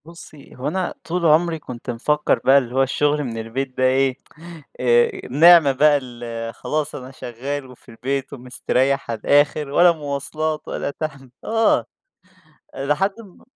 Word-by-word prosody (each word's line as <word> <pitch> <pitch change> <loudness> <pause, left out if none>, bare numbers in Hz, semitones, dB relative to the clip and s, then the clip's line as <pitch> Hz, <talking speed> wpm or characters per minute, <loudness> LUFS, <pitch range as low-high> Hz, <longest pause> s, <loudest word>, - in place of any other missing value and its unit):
بُصّي 165 -3 -14
هو 130 - -5
أنا 185 +3 -2
طول 175 +1 -2
عُمري 160 +1 +3
كنت 125 -3 -9
مفكّر 150 +6 0
بقى 135 +1 +6
اللي 125 -2 -1
هو 135 - +4
الشغل 145 +2 0
من 115 -4 -5
البيت 130 +4 -5
ده 130 - 0
إيه، 130 0 +2 0.6
آآ، 120 -1 +2
نعمة 160 +1 +7
بقى 145 +2 +4
ال 120 -2 -7
خلاص 155 0 -3
أنا 130 -1 -8
شغال 135 +3 -6
وفي 125 0 -17
البيت 130 +4 -4
ومسترّيح 130 +1 -1
على 115 - -4
الآخر 145 +3 +2
ولا 175 +5 +5
مواصلات 155 0 -4
ولا - - -3
تعب، 140 -3 -7
آه، 225 0 +2 0.9
آآ، 135 - -5
لحد 190 +8 +1
م 200 -5 -16
140 Hz, 155 wpm, -21 LUFS, 125-155 Hz, 0.9 s, نعمة